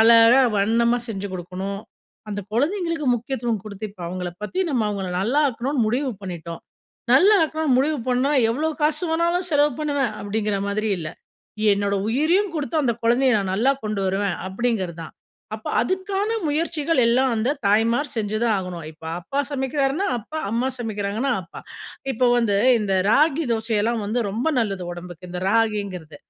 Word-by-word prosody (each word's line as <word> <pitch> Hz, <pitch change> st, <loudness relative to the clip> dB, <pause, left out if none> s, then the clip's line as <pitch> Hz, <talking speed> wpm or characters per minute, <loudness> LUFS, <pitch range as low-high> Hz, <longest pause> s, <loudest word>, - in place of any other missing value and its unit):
அழகா 230 Hz, +3 st, +7 dB, 0.2 s
வண்ணமா 235 Hz, +4 st, +2 dB
செஞ்சு 200 Hz, -2 st, -4 dB
குடுக்கணும். 185 Hz, +3 st, -5 dB, 0.5 s
அந்த 205 Hz, -1 st, -3 dB
குழந்தைங்களுக்கு 330 Hz, -, 0 dB
முக்கியத்துவம் 235 Hz, -3 st, -2 dB
குடுத்து, 210 Hz, 0 st, -7 dB
இப்ப 190 Hz, -3 st, -12 dB
அவங்கள 180 Hz, 0 st, -4 dB
பத்தி 365 Hz, -, -2 dB
நம்ம 250 Hz, -5 st, +1 dB
அவங்கள 200 Hz, -2 st, -3 dB
நல்லா 255 Hz, +10 st, +2 dB
ஆக்கணும்னு 250 Hz, +1 st, -1 dB
முடிவு 260 Hz, +4 st, 0 dB
பண்ணிட்டோம். 170 Hz, -3 st, -6 dB, 0.5 s
நல்லா 380 Hz, +11 st, +7 dB
ஆக்கணும்னு 315 Hz, -4 st, 0 dB
முடிவு 290 Hz, +2 st, +1 dB
பண்ணா, 255 Hz, +3 st, +2 dB, 0.2 s
எவ்ளோ 305 Hz, +7 st, 0 dB
காசு 305 Hz, +3 st, +2 dB
வேணாலும் 340 Hz, +2 st, +1 dB
செலவு 290 Hz, -1 st, +3 dB
பண்ணுவேன் 285 Hz, -6 st, 0 dB
அப்படிங்கற 205 Hz, 0 st, -1 dB
மாரி 215 Hz, +2 st, -1 dB
இல்ல. 155 Hz, -, -4 dB, 0.6 s
என்னோட 200 Hz, 0 st, 0 dB
உயிரையும் 330 Hz, -, +2 dB
குடுத்து 300 Hz, +2 st, -2 dB
அந்த 240 Hz, -4 st, +1 dB
குழந்தைய 255 Hz, +3 st, +4 dB
நான் 195 Hz, -2 st, -2 dB
நல்லா 250 Hz, +7 st, +3 dB
கொண்டு 210 Hz, -1 st, -2 dB
வருவேன், 195 Hz, +1 st, 0 dB
அப்படிங்கறதுதான். 190 Hz, -7 st, -3 dB, 0.4 s
அப்ப, 215 Hz, -, -10 dB
அதுக்கான 380 Hz, -, -1 dB, 0.2 s
முயற்சிகள் 310 Hz, -1 st, 0 dB
எல்லா 245 Hz, +3 st, +3 dB
அந்த 225 Hz, +3 st, 0 dB, 0.2 s
தாய்மார் 230 Hz, +7 st, +2 dB
செஞ்சுதா 215 Hz, +1 st, -1 dB
ஆகணும். 180 Hz, -4 st, -6 dB
இப்ப 155 Hz, +1 st, -17 dB, 0.2 s
அப்பா 275 Hz, +10 st, -2 dB
சமைக்கறாருன்னா, 275 Hz, +5 st, 0 dB
அப்பா, 280 Hz, +8 st, -7 dB
அம்மா 235 Hz, +4 st, 0 dB
சமைக்கறாங்கன்னா 220 Hz, +3 st, -2 dB
அம்மா. 180 Hz, -, -11 dB, 0.5 s
இப்ப 250 Hz, +1 st, +2 dB
வந்து, 220 Hz, -4 st, +2 dB, 0.2 s
இந்த 195 Hz, -2 st, 0 dB, 0.2 s
ராகி 310 Hz, +4 st, +3 dB
தோசை 225 Hz, 0 st, -1 dB
எல்லா 230 Hz, +2 st, +1 dB
வந்து 225 Hz, +4 st, 0 dB
ரொம்ப 240 Hz, +10 st, -1 dB
நல்லது 195 Hz, -4 st, -2 dB
உடம்புக்கு, 175 Hz, 0 st, -9 dB
இந்த 180 Hz, -, -4 dB
ராகிங்கறது. 200 Hz, -8 st, -1 dB
230 Hz, 150 wpm, -23 LUFS, 200-285 Hz, 0.6 s, அழகா